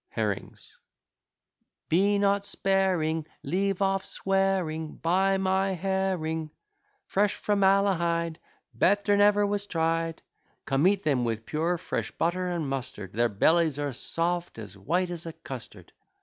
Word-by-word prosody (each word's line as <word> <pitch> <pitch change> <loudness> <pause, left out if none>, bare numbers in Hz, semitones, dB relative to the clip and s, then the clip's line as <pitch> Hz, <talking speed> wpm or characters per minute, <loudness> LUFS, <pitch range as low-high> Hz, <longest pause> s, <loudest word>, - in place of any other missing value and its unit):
HERRINGS - - -4 1.1
Be 200 +5 +3
not 200 0 +2
sparing, 185 -6 0 0.2
Leave 195 +1 0
off 195 0 +1
swearing. 190 -5 -1
Buy 190 +3 +2
my 190 0 +1
herring 180 -4 -1 0.6
Fresh 205 +1 +1
from 205 -1 0
Malahide, 170 -4 +2 0.4
Better 205 +1 +3
never 205 0 +4
was 205 0 -2
tried. 165 -1 -1 0.4
Come, 140 +5 +2
eat 200 0 +2
them 135 -5 +1
with 115 -1 -2
pure 165 +3 0
fresh 175 - -3
butter 180 +2 -1
and 170 -4 -2
mustard, 130 -8 -5
Their 120 +2 +2
bellies 155 +8 +3
are 145 -2 -2
soft, 170 +6 -2
and 110 - -6
as 100 -1 -14
white 175 - -1
as 170 -1 -6
a 165 - -6
custard. 110 - -10
175 Hz, 135 wpm, -27 LUFS, 155-195 Hz, 1.1 s, never